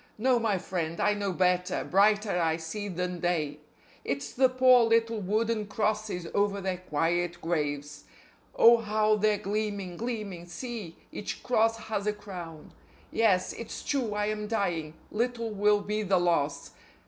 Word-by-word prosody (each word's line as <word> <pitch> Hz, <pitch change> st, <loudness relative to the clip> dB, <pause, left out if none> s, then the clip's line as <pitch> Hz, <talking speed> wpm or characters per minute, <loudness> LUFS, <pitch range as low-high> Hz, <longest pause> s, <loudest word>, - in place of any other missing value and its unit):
No, 250 Hz, +2 st, +3 dB
my 220 Hz, -4 st, +1 dB
friend, 170 Hz, -2 st, -3 dB
I 210 Hz, -, +3 dB
know 200 Hz, -1 st, -2 dB
better; 180 Hz, 0 st, +1 dB
brighter 205 Hz, -1 st, +3 dB
I 160 Hz, -1 st, +1 dB
see 170 Hz, +6 st, -5 dB
than 180 Hz, -1 st, -3 dB
day: 155 Hz, -4 st, -1 dB, 0.4 s
It's 140 Hz, 0 st, -3 dB
the 260 Hz, 0 st, +4 dB
poor 255 Hz, -1 st, +6 dB
little 230 Hz, -1 st, +2 dB
wooden 215 Hz, +2 st, 0 dB
crosses 215 Hz, -4 st, -1 dB
over 200 Hz, 0 st, +1 dB
their 190 Hz, -2 st, -2 dB
quiet 175 Hz, +1 st, -1 dB
graves. 145 Hz, -3 st, -3 dB, 0.5 s
Oh, 235 Hz, +1 st, +7 dB
how 215 Hz, -1 st, +2 dB
they're 215 Hz, 0 st, +2 dB
gleaming, 200 Hz, -3 st, -3 dB
gleaming! 210 Hz, -7 st, -4 dB
See! 210 Hz, -3 st, -7 dB
Each 205 Hz, -, -6 dB
cross 225 Hz, -2 st, +2 dB
has 210 Hz, -2 st, -3 dB
a 210 Hz, -, +2 dB
crown. 180 Hz, -6 st, -9 dB, 0.4 s
Yes, 200 Hz, -5 st, +2 dB
it's 230 Hz, -, -7 dB
true 245 Hz, -7 st, -1 dB
I 210 Hz, 0 st, 0 dB
am 210 Hz, 0 st, -2 dB
dying; 170 Hz, -8 st, -1 dB, 0.2 s
little 230 Hz, 0 st, -1 dB
will 210 Hz, 0 st, +3 dB
be 210 Hz, +1 st, -2 dB
the 195 Hz, -2 st, +2 dB
loss. 170 Hz, -5 st, 0 dB
205 Hz, 150 wpm, -28 LUFS, 175-215 Hz, 0.5 s, Oh